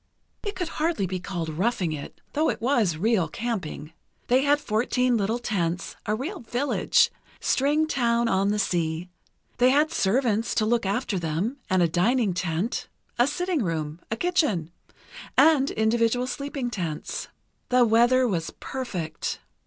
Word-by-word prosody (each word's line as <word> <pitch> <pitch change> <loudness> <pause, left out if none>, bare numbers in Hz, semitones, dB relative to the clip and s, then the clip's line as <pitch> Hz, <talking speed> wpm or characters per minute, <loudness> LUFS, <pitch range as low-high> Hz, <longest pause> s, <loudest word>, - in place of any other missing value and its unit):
It 410 -3 -4
could 360 -2 -2
be - - -8
hardly 310 - 0
be 185 0 -3
called 175 -3 -4
roughing 180 +2 0
it, 145 -2 -7
though 310 +2 +2
it - - -2
was 225 - +1
real 200 -2 +2
camping. 170 -6 -4 0.4
They 255 +2 +5
had 290 +1 +3
fourteen 250 +1 +1
little 220 +2 0
tents, 180 -7 -2
a 210 - +1
real 315 - -4
village—string 280 +3 +1
town 235 -5 +1
on 195 -1 +2
the 210 - +1
sea. 170 -3 -1 0.5
They 250 +1 +6
had 295 +4 +3
servants 225 +1 +1
to 215 - +2
look 230 -2 +1
after 200 -1 -1
them, 170 - -2
and 185 -2 +3
a - - +4
dining 200 +5 +2
tent, 175 +6 -2 0.3
a 240 - +5
sitting 355 +1 -1
room, 160 -3 -3
a 220 - -2
kitchen, 280 - +1 0.7
and 295 -4 +5
individual 230 +2 +1
sleeping 280 -2 -4
tents. 170 -8 -4 0.4
The 250 -1 +5
weather 240 +3 +4
was 170 -7 -1
perfect. 180 - -4
225 Hz, 150 wpm, -26 LUFS, 180-260 Hz, 0.7 s, They